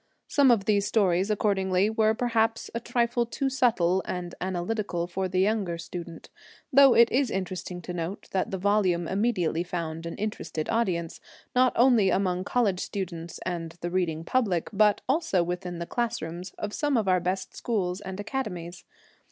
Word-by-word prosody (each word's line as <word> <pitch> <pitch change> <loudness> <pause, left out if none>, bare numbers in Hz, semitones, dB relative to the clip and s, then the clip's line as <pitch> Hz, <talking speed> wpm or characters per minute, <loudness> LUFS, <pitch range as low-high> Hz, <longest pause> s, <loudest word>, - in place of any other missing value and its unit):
Some 280 -2 +4
of 225 -5 +3
these 205 -1 +2
stories, 195 -3 +2
accordingly, 195 -2 +2
were 220 0 +2
perhaps 225 -1 0
a 230 - -2
trifle 235 0 0
too 270 +3 -2
subtle 190 -8 +2
and 175 -1 -4
analytical 185 0 -2
for 185 +2 -2
the 185 0 -1
younger 195 -4 0
student, 170 0 -8 0.4
though 275 -1 +7
it 235 0 +6
is 260 0 +2
interesting 185 -2 -4
to 180 - -5
note 175 +3 -5
that 190 - 0
the 190 - -3
volume 185 -3 +1
immediately 190 -5 0
found 165 -2 -4
an 170 - -5
interested 205 -7 -4
audience, 180 -8 -1 0.4
not 255 0 +5
only 235 -5 +5
among 185 -1 0
college 205 -7 +1
students 170 -4 -5
and 170 -2 -3
the 175 - -3
reading 170 -3 -1
public, 200 -9 0
but 210 0 +4
also 260 - +2
within 175 0 -4
the 170 - -4
classrooms 180 -6 -3
of 210 0 -4
some 290 -4 +1
of 215 -3 0
our 185 -1 +4
best 185 +2 -3
schools 190 -5 -2
and 190 0 -7
academies. 195 -7 -4
190 Hz, 165 wpm, -27 LUFS, 175-225 Hz, 0.4 s, though